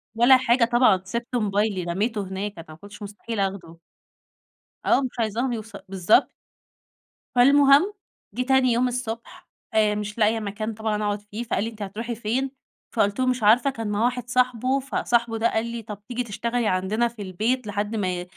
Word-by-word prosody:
ولا 240 +3 +7
حاجة 245 -1 +3
طبعًا، 235 -5 +4
سِبت 235 +4 -4
موبايلي 205 -3 0
رميته 205 +6 -1
هناك، 195 +2 -4
أنا 165 - -9
ما 155 - -10
كنتش 205 +5 -13
مستحيل 210 +2 -6
آخده. 190 -4 -3 1.1
آه، - - +4
مش 255 -2 -5
عايزاهم 230 +3 0
يوص 225 0 -6 0.2
بالضبط. 195 +7 +3 1.1
فالمهم 280 +8 +5 0.4
جِه 245 - -2
تاني 265 -1 +3
يوم 240 +2 +2
الصبح 235 -2 -6 0.3
آآ، 215 -1 +3
مش 210 +1 -5
لاقية 220 0 +3
مكان 215 +1 -4
طبعًا 215 -1 -2
أقعد 205 0 -1
فيه 210 +3 -6
فقال 215 -3 -1
لي: 225 - -2
"أنتِ 220 -2 -13
هترُوحي 225 +4 -4
فين؟" 240 +5 -2 0.4
فقلت 205 -1 +1
له: 260 - +2
"مش 255 -2 0
عارفة"، 235 +7 +5
كان 225 -5 -5
معاه 205 +1 0
واحد 245 -1 -2
صاحبه، 255 +1 +1
فصاحبه 235 -3 0
ده 230 +1 +2
قال 220 +1 0
لي 235 0 -5
طَب 210 -2 -8
تيجي 250 0 -2
تشتغلي 235 +1 -2
عندنا 200 +5 +1
في 230 -2 -10
البيت 215 +6 -1
لحد 205 +2 -2
ما 185 -4 -1
225 Hz, 175 wpm, -24 LUFS, 205-245 Hz, 1.1 s, ولا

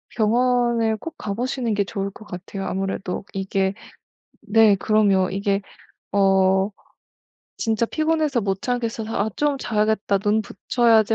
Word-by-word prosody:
병원에 235 0 +2
꼭 330 +5 -7
가 200 - -4
보시는 245 0 -2
게 200 0 +1
좋을 195 0 -3
것 215 - -14
같아요 195 +1 -6
아무래도. 190 -1 -3
이게 195 0 0 0.7
네 220 -1 +5
그럼요. 200 -2 +2
이게 200 +1 0 0.5
어 190 0 +3 0.9
진짜 225 0 0
피곤해서 310 -2 0
못 195 -1 -1
자겠어서 230 -3 -2
'아 210 +2 0
좀 295 -1 +1
자야겠다. 215 -4 +1
눈 210 +2 +1
붙여야지.' 225 +1 +2
215 Hz, 270 characters per minute, -22 LUFS, 195-235 Hz, 0.9 s, 네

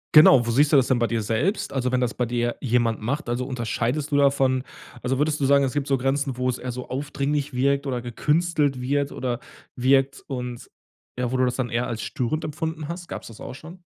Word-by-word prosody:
Genau, 135 -5 +8
wo 115 - 0
siehst 145 +5 +3
du - - +8
das 130 - +4
denn 125 -2 +2
bei 120 - +2
dir 115 -2 -1
selbst? 115 - 0
Also, 130 -2 -1
wenn 125 - +2
das 120 -1 0
bei 125 - -1
dir 120 0 -1
jemand 120 -3 +1
macht, 135 +3 -2
also, 125 +1 -1
unterscheidest 125 +3 -2
du 145 - +3
davon? 135 -2 +3 0.4
Also, 130 +1 0
würdest 150 0 +1
du 135 - +1
sagen, 140 0 +5
es 130 - 0
gibt 145 -1 -2
so 135 -1 +2
Grenzen, 135 +1 0
wo 125 0 0
es 125 - -1
eher 125 -1 -5
so 125 0 -7
aufdringlich 140 +1 -2
wirkt 140 +2 +1
oder 125 -2 -2
gekünstelt 150 +2 0
wird 140 +2 0
oder 125 -2 -2 0.4
wirkt 135 +2 +3
und 125 -3 -5 0.5
ja, 125 -1 -1
wo 130 - 0
du 130 - +3
das 125 - 0
dann 125 -2 -2
eher 120 +1 -1
als 115 -2 -4
störend 140 +6 -2
empfunden 155 +1 -4
hast? 175 +1 -6
Gab's - - -7
das 110 - -13
auch - - -7
schon? 170 +5 -12
130 Hz, 230 wpm, -24 LUFS, 125-145 Hz, 0.5 s, Genau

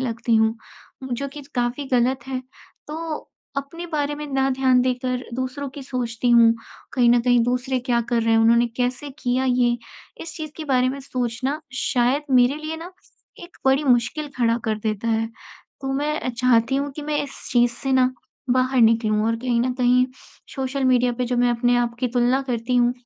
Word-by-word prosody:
लगती 230 -2 -1
हूँ, 220 0 +3 0.5
म 260 -1 -5
जो 280 +4 -3
कि 290 +1 -10
काफ़ी 245 +3 -1
गलत 250 0 +1
है। 260 -1 -2 0.5
तो 315 0 -5 0.3
अपने 280 +5 -5
बारे 295 -1 0
में 300 0 -6
ना 270 0 +2
ध्यान 260 -1 +4
देकर 255 0 -1
दूसरों 260 +3 -3
की 285 - -7
सोचती 245 -2 -2
हूँ, 230 -1 +7 0.4
कहीं 245 -2 +3
न 240 0 +5
कहीं 245 0 +3
दूसरे 250 +2 0
क्या 240 -1 +2
कर 235 -1 +2
रहे 230 - +1
हैं, 225 - +5
उन्होंने 235 +1 +5
कैसे 250 +3 -2
किया 255 -1 0
ये? 245 -2 +2 0.5
इस 325 -1 -8
चीज 310 -3 -6
के 315 - -6
बारे 255 -3 +2
में 270 +2 -4
सोचना, 255 +2 -3
शायद 260 +2 +1
मेरे 255 +2 +4
लिए 310 +1 -5
ना 340 +3 -9 0.5
एक 345 0 -13
बड़ी 270 +2 +3
मुश्किल 255 +4 +1
खड़ा 235 -2 +2
कर 215 -1 -1
देता 215 +1 -2
है। 225 0 +1 0.5
तो 270 0 -3
मैं 295 +3 -1
अ, - - -3
चाहती 240 0 +2
हूँ 285 +1 -1
कि 300 - -5
मैं 295 0 -1
इस 280 -1 -9
चीज़ 240 -1 +4
से 270 +3 -3
ना, 255 -1 +3 0.4
बाहर 255 +1 +2
निकलूँ 220 -2 +3
और 230 0 +1
कहीं 240 0 0
न 250 +1 0
कहीं 250 0 +3 0.5
सोशल 270 0 -2
मीडिया 250 -1 +3
पे 250 - +1
जो 245 0 -1
मैं 245 0 +3
अपने 245 +1 +2
आप 240 -1 0
की 250 - +1
तुलना 245 +2 +2
करती 250 -1 -1
हूँ, 240 0 +4
250 Hz, 200 wpm, -23 LUFS, 240-270 Hz, 0.5 s, हूँ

